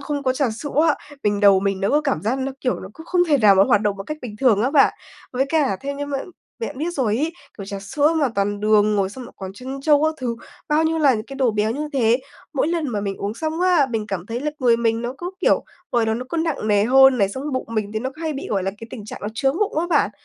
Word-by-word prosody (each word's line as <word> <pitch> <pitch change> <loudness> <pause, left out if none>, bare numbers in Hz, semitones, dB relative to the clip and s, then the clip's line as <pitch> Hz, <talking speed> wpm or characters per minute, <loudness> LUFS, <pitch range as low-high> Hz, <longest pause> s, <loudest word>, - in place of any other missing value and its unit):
không 285 0 -3
có 260 - +2
trà 260 -2 0
sữa 240 +7 -6 0.2
á, 300 - +4 0.3
mình 205 0 +1
đầu 200 -2 +6
mình 195 -1 -1
nó 195 - +1
có 295 - +3
cảm 280 -8 -1
giác 235 +6 0
nó, 265 0 -2
kiểu, 250 - -1
nó 190 - -8
cũng 320 +6 -13
không 355 -1 +2
thể 290 - +4
nào 210 -4 +6
mà 190 - +6
nó - - +2
hoạt 205 - +4
động 205 -2 0
một 195 - -6
cách 305 - -4
bình 215 -4 -7
thường 220 -4 +3
á 255 - +1
bạn. 285 -2 +5 0.4
Với 265 +2 +1
cả 290 -10 +1
theo 280 +1 -4
như 285 0 -4
mà 280 -1 -2 0.4
bạn 295 - -5
biết 330 +3 -1
rồi 230 -8 0
ấy, 315 +5 -1 0.3
kiểu, 200 - -5
trà 200 0 -6
sữa 290 +11 +1
mà 280 - +3
toàn 200 +1 -1
đường 210 0 +3
rồi 195 -1 +1
xong 255 +3 -9
lại - - -12
còn 190 -1 -7
trân 260 +6 -7
châu 295 0 +4
các 315 - +1
thứ, 235 -2 -2 0.3
bao 305 +2 +3
nhiêu 325 0 +1
là 280 -4 +4
những 215 0 -4
cái 275 - -8
đồ 260 -3 +2
béo 210 0 0
như 295 +6 -3
thế. 240 -2 +2 0.3
Mỗi 290 +2 +1
lần 335 -4 -1
mà 215 -4 -2
mình 200 -1 -3
uống 205 +2 -4
xong 315 +6 -3
á, 355 -6 +4
mình 220 -2 -2
cảm 190 -3 -4
thấy 235 +3 -4
là 300 - -1
người 240 -3 +4
mình 230 0 0
nó 245 +2 -4
cứ, 355 +1 -4
kiểu, - - +3 0.3
ngồi 230 -2 +2
đó 220 - +1
nó 250 +3 -4
cứ 335 - -4
nặng 320 -9 -1
nề 205 0 +3
hơn 265 +1 +6
này, 195 -1 +3
xong 260 +7 -6
cái 300 - -3
bụng 255 - -2
mình 210 -1 -1
thì 215 - -1
nó 260 +3 -3
hay 320 -1 -3
bị, 275 - -6
gọi 195 -3 0
là, 195 - -1
cái 230 - -9
tình 215 -5 -8
trạng - - -8
nó 210 - -2
chướng 270 +6 0
bụng 405 -7 0
á 345 - 0
bạn. 290 - +2
255 Hz, 305 wpm, -21 LUFS, 210-290 Hz, 0.4 s, đầu